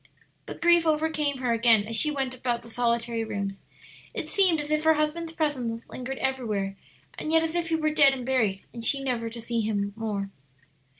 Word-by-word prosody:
But -, -, -7 dB
grief 345 Hz, -1 st, +5 dB
overcame 305 Hz, -2 st, +1 dB
her 245 Hz, -2 st, +1 dB
again 230 Hz, -2 st, +4 dB
as 225 Hz, +1 st, -2 dB
she 300 Hz, +7 st, +3 dB
went 270 Hz, -3 st, -2 dB
about 240 Hz, -2 st, -2 dB
the 230 Hz, -, -11 dB
solitary 235 Hz, -1 st, 0 dB
rooms; 200 Hz, -2 st, -4 dB, 0.5 s
it -, -, -3 dB
seemed 370 Hz, -5 st, +3 dB
as 295 Hz, 0 st, -5 dB
if 305 Hz, 0 st, +1 dB
her 320 Hz, 0 st, +5 dB
husband's 320 Hz, +2 st, -1 dB
presence 255 Hz, -8 st, -2 dB
lingered 260 Hz, +1 st, -5 dB
everywhere, 215 Hz, -7 st, -2 dB, 0.4 s
and 310 Hz, -, -3 dB
yet 325 Hz, 0 st, +4 dB
as 325 Hz, 0 st, -2 dB
if 345 Hz, -1 st, -1 dB
he 325 Hz, -, +2 dB
were 310 Hz, -1 st, +1 dB
dead 285 Hz, -3 st, +6 dB
and 260 Hz, -2 st, -4 dB
buried, 220 Hz, -7 st, +1 dB
and 235 Hz, -, -7 dB
she 275 Hz, +4 st, +2 dB
never 240 Hz, -3 st, -1 dB
to 235 Hz, +1 st, -8 dB
see 230 Hz, 0 st, -2 dB
him 205 Hz, -2 st, -1 dB
more. 205 Hz, -3 st, -3 dB
255 Hz, 200 wpm, -27 LUFS, 225-305 Hz, 0.5 s, dead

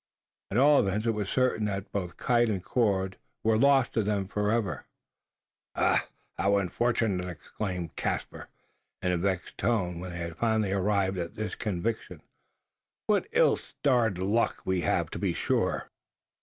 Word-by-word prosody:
At 100 Hz, -, -1 dB
all 145 Hz, +2 st, +6 dB
events, 100 Hz, +3 st, 0 dB
it 115 Hz, -, +3 dB
was 105 Hz, -3 st, -3 dB
certain, 130 Hz, -4 st, +1 dB
that 100 Hz, -1 st, -4 dB
both 90 Hz, -4 st, -4 dB
kite 120 Hz, -1 st, +2 dB
and 95 Hz, -4 st, -2 dB
cord 95 Hz, -6 st, 0 dB, 0.3 s
were 110 Hz, 0 st, +3 dB
lost 135 Hz, +2 st, +4 dB
to 115 Hz, -, +2 dB
them 100 Hz, -2 st, -1 dB
for 105 Hz, +1 st, -1 dB
ever. 110 Hz, -4 st, -1 dB, 0.9 s
"Ach! -, -, +3 dB, 0.4 s
how 100 Hz, -, +2 dB
very 100 Hz, -1 st, +3 dB
unfortunate!" 100 Hz, -2 st, 0 dB
exclaimed 90 Hz, -2 st, -5 dB
Caspar, -, -, -3 dB, 0.6 s
in 90 Hz, -, +2 dB
a 90 Hz, -, +1 dB
vexed 95 Hz, 0 st, -2 dB
tone, 90 Hz, -8 st, 0 dB
when 90 Hz, +1 st, -6 dB
they 85 Hz, -, -6 dB
had 85 Hz, -1 st, -5 dB
finally 110 Hz, -3 st, +1 dB
arrived 100 Hz, -1 st, +1 dB
at 85 Hz, -1 st, -4 dB
this 110 Hz, -1 st, -3 dB
conviction. 110 Hz, +2 st, -3 dB, 0.8 s
"What -, -, +2 dB
ill -, -, +4 dB
starred 120 Hz, -8 st, 0 dB
luck 100 Hz, +6 st, 0 dB
we 95 Hz, -1 st, +1 dB
have, -, -, 0 dB
to -, -, -5 dB
be -, -, 0 dB
sure!" -, -, -1 dB
100 Hz, 160 wpm, -28 LUFS, 95-115 Hz, 0.9 s, all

